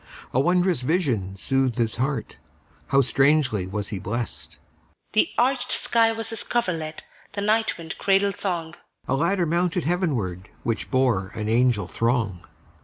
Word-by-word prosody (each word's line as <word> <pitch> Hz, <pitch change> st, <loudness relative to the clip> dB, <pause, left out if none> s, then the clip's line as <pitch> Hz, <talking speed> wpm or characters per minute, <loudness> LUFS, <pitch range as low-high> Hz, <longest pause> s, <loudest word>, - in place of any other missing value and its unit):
A 130 Hz, -, +3 dB
wondrous 175 Hz, +1 st, +2 dB
vision 125 Hz, -, 0 dB
soothed 135 Hz, +4 st, +1 dB
his 115 Hz, -2 st, 0 dB
heartHow 135 Hz, +1 st, -2 dB
strangely 135 Hz, -6 st, +2 dB
was 100 Hz, +1 st, -3 dB
he 100 Hz, -, -4 dB
blessed! 115 Hz, +5 st, -4 dB, 0.6 s
The 215 Hz, -, +4 dB
arched 255 Hz, 0 st, +1 dB
sky 230 Hz, -1 st, +4 dB
was 225 Hz, 0 st, -4 dB
his 225 Hz, -, -6 dB
coverlet, 165 Hz, -9 st, -1 dB, 0.3 s
The 200 Hz, -, -2 dB
night 220 Hz, +2 st, +2 dB
wind 165 Hz, -1 st, -6 dB
cradle 195 Hz, 0 st, +3 dB
song;A 170 Hz, -4 st, -4 dB
ladder 175 Hz, +5 st, +1 dB
mounted 175 Hz, +2 st, +1 dB
heavenwardWhich 115 Hz, -, -2 dB
bore 125 Hz, -8 st, +2 dB
an 105 Hz, -1 st, -3 dB
angel 120 Hz, -1 st, +3 dB
throng. 115 Hz, -6 st, 0 dB
140 Hz, 130 wpm, -24 LUFS, 115-180 Hz, 0.6 s, The